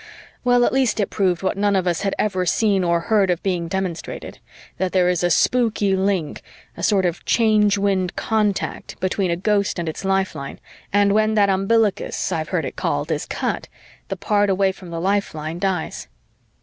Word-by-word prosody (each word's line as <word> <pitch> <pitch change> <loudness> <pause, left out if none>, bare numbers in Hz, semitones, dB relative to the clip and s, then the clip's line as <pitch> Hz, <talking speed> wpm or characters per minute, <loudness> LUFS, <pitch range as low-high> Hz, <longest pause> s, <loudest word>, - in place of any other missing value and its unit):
Well, 245 -1 +4
at - - 0
least 260 -5 +1
it 200 - 0
proved 185 -3 0
what 190 +1 -1
none 205 0 +2
of 185 -1 +1
us 175 -2 0
had 195 -2 -1
ever 185 -3 0
seen 195 +2 +2
or 170 -1 +1
heard 205 0 +2
of 175 -1 0
being 180 -3 -1
demonstrated: 185 -2 -4 0.4
that 185 -1 -1
there 180 -2 +3
is 180 -1 0
a 175 - +3
spooky 210 0 +2
link 190 -5 -1 0.3
a - - -8
sort 195 -3 +2
of 175 -2 -2
Change 215 -3 +3
Wind 195 -3 0
contact 210 -3 -1
between 185 0 0
a 170 - +1
Ghost 200 +2 0
and 170 -1 -3
its 160 - -5
lifeline; 190 -8 -2 0.3
and 200 0 +3
when 215 +1 +2
that 200 -2 +4
umbilicus, 215 - +1
I've - - -2
heard - - -1
it - - -6
called, - - -2
is - - -2
cut, - - -3 0.4
the - - -4
part 205 -2 +1
away 195 0 +2
from 190 -2 -12
the 165 0 -4
lifeline 170 -4 -2
dies. 185 -3 -2
195 Hz, 190 wpm, -21 LUFS, 180-205 Hz, 0.4 s, Well